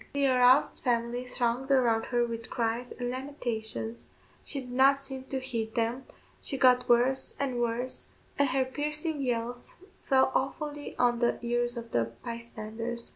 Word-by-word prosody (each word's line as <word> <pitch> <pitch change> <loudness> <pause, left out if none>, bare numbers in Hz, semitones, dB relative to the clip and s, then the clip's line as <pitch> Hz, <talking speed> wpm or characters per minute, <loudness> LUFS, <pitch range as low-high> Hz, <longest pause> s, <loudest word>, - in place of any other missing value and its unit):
The 280 0 +2
aroused 255 0 +5
family 240 0 0
thronged 250 +1 -1
around 240 -5 +3
her 240 -1 +1
with 230 0 -6
cries 235 +1 -1
and 245 -1 -3
lamentations; 235 -4 -4 0.4
she 275 - -4
did 250 -1 -10
not 275 +2 +4
seem 265 -1 -4
to 265 0 -3
heed 230 -4 -4
them, 235 +3 -1 0.4
she 270 - -4
got 250 -1 +4
worse 245 +3 +3
and 260 -3 -1
worse, 240 +2 -2 0.3
and 285 -1 +4
her 260 0 +2
piercing 300 +3 -2
yells 245 -1 -2 0.3
fell 265 -1 +4
awfully 290 +2 -2
on 240 -1 +3
the 240 -1 +2
ears 240 0 0
of 235 0 -7
the 115 -1 +2 0.2
bystanders. 230 0 -5
245 Hz, 155 wpm, -29 LUFS, 235-265 Hz, 0.4 s, aroused